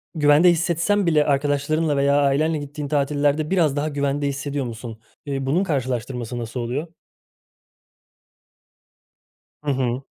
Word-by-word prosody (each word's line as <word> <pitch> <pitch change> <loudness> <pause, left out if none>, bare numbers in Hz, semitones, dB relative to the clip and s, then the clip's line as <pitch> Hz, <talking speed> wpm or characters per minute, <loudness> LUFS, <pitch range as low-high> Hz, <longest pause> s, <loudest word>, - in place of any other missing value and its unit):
güvende 150 +3 +5
hissetsen 170 +4 +1
bile 155 -3 +3
arkadaşlarınla 145 +2 +1
veya 140 +1 +3
ailenle 150 +3 +2
gittiğin 145 0 -6
tatillerde 145 +1 +1
biraz 165 -7 +2
daha 150 +2 0
güvende 140 0 -1
hissediyor 140 0 -3
musun? 115 -1 -7 0.3
Eee, 135 -2 -3
bunun 160 +8 +1
karşılaştırması 125 - -3
nasıl 115 +1 -5
oluyor? 125 +7 -3 2.8
Hı 145 - 0
hı. 130 -1 -1
145 Hz, 120 wpm, -22 LUFS, 135-155 Hz, 2.8 s, güvende